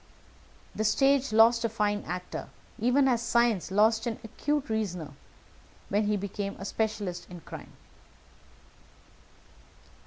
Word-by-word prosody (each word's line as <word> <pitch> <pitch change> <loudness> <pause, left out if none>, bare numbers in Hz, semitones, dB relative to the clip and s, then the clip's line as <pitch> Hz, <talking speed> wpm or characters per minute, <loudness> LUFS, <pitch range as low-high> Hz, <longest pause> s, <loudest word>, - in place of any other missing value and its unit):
The 215 - -2
stage 275 +4 +3
lost 230 +2 +5
a 230 - +1
fine 210 -2 0
actor, 180 +2 -5 0.3
even 250 +5 +3
as 240 -3 +2
science 235 -6 +2
lost 220 +3 +3
an 230 - -2
acute 290 +6 -2
reasoner, 195 -8 -3 0.8
when 205 +1 +1
he 210 0 +1
became 200 0 -4
a 195 - -7
specialist 210 -4 -2
in 175 -2 -9
crime. - - -10
220 Hz, 120 wpm, -28 LUFS, 200-235 Hz, 0.8 s, lost